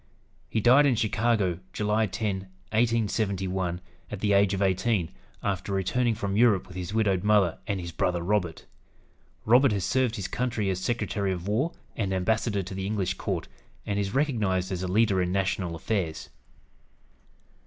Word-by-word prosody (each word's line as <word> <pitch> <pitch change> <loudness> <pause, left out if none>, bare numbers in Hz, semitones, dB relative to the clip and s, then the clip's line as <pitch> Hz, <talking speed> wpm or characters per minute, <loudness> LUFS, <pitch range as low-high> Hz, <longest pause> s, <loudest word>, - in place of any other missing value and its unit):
He 110 - 0
died 130 +6 +6
in 130 - +3
Chicago, 110 -5 +1
July 105 +1 +1
10, 95 -1 -3 0.3
1871, 100 -6 0 0.3
at 105 - -5
the 105 0 +1
age 100 0 +4
of - - -3
eighteen, 95 -1 +1 0.3
after 100 -1 -2
returning 115 +5 +1
from 100 -2 -2
Europe 110 -4 +4
with 90 - -12
his 90 -1 -5
widowed 100 -4 +1
mother 105 -5 +3
and 100 -3 -1
his 85 -1 -6
brother 85 +1 -1
Robert. 90 -4 -1 0.8
Robert 125 +3 +5
has 100 -4 -1
served 130 -3 +1
his 100 -4 -3
country 115 -5 -1
as 90 - -2
Secretary 100 -2 -1
of 90 0 -4
War 130 +11 0 0.2
and 100 -3 -1
Ambassador 105 +2 0
to 95 - -8
the 95 0 -3
English 100 -3 -1
court, 90 -2 -3 0.4
and 100 0 -1
is 100 +2 -2
recognized 105 -10 0
as 90 -1 -2
a 95 - -2
leader 100 0 +3
in 90 0 -1
national 95 -2 -1
affairs. 85 -2 -3
100 Hz, 165 wpm, -27 LUFS, 95-110 Hz, 0.8 s, died